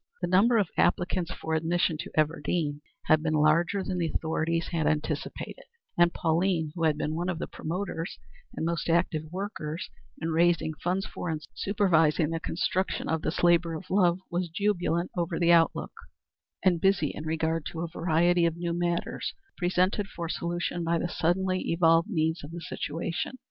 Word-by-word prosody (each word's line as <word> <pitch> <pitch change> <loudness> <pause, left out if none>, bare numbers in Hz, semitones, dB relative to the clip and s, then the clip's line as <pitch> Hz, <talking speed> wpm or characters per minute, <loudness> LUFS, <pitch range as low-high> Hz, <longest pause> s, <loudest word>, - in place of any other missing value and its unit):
The 175 - -1
number 205 +7 +4
of 200 -6 +2
applicants 180 -1 +1
for 160 -3 -4
admission 165 +1 +1
to - - -5
Everdean 155 -1 0 0.2
had 155 0 +4
been 155 0 0
larger 165 +6 +3
than 185 -1 -2
the 165 -2 0
authorities 165 +1 -1
had 160 -3 0
anticipated, 155 - -3 0.3
and 175 0 +5
Pauline, 165 -1 +1
who 165 -1 -1
had 155 -2 +2
been 155 - -2
one 175 +3 -2
of 180 - -2
the - - -3
promoters 170 0 -4 0.4
and - - -2
most 170 0 -1
active 165 -2 +1
workers 180 -4 -5 0.3
in 165 - -2
raising 165 -1 +2
funds 185 +2 0
for 175 - -5
and 155 -1 -3
supervising 165 -6 +2
the 165 - -1
construction 185 +3 -1
of 160 -1 0
this 160 - -2
labor 170 -1 +4
of 185 +3 -8
love, 180 -3 +4
was 175 0 -1
jubilant 175 -2 0
over 170 -1 -1
the 170 -1 +4
outlook, 165 -1 +2 0.7
and 175 -3 +3
busy 190 -6 +3
in 150 - -6
regard 160 0 -1
to 165 - -5
a 170 - -2
variety 170 +1 +2
of 165 0 -3
new 170 0 -2
matters 175 0 -2 0.2
presented 185 +3 +1
for 170 -3 -5
solution 170 +1 -2
by 170 +1 +1
the 175 - -1
suddenly 185 +3 +1
evolved 165 +2 +4
needs 160 -5 0
of 145 - -7
the 170 +1 -7
situation. 165 - -3
170 Hz, 175 wpm, -28 LUFS, 160-180 Hz, 0.7 s, and